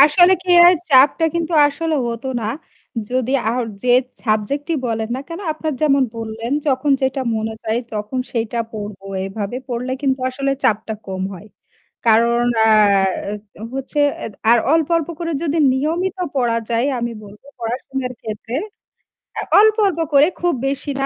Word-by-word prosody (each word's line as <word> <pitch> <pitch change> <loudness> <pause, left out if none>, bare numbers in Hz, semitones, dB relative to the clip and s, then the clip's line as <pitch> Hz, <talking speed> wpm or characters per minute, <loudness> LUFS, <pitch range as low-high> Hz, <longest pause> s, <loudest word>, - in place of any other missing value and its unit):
আসলে 330 +6 +7
কি 370 - -3
হয় 355 +1 +8 0.2
চাপটা 280 +5 +5
কিন্তু 340 0 -2
আসলে 320 +3 -2
হত 230 +1 -5 0.2
না। - - -4 0.7
যদি 255 0 0 0.2
আ - - +1 0.3
যে 250 - +1 0.3
সাবজেক্টটি 245 +9 -1
বলেন 225 -1 -2
না - - -4
কেন 335 +2 -6
আপনার 310 0 -3
যেমন 275 -3 +4
বললেন, 225 +2 -5
যখন 280 +1 +1
যেটা 265 +1 0 0.2
মনে 220 0 -3
যায় 220 +2 0 0.2
তখন 210 +5 -3
সেটা 230 0 -2
পড়বো 205 -2 -7 0.2
এভাবে 200 +3 -4
পড়লে 250 +1 -3
কিন্তু 265 -1 +1
আসলে 275 +2 -2
চাপটা 220 +1 +1
কম 190 -1 -4
হয়। 190 +3 -12 0.6
কারণ 235 +2 +4 0.2
আ - - +4 0.9
এ্যা - - -11
হচ্ছে 270 +2 -4 0.3
এ - - -2 0.2
আর 240 - +6
অল্প, 320 -2 +2
অল্প, 330 -2 -2
করে 335 -1 -2
যদি 325 0 0
নিয়মিত 335 +8 -1 0.2
পড়া 235 -3 +1
যায় 235 +3 +1
আমি 235 0 -2
বলব 205 +1 -14 0.2
পড়াশোনার 250 +2 -3
ক্ষেত্রে 220 +2 -6 0.9
আ - - -1 0.2
অল্প, 430 +1 +6
অল্প, 345 -4 -2
করে 285 +2 +6
খুব 350 -1 +2
বেশি 280 +1 -3
না। - - +1
255 Hz, 160 wpm, -19 LUFS, 225-300 Hz, 0.9 s, হয়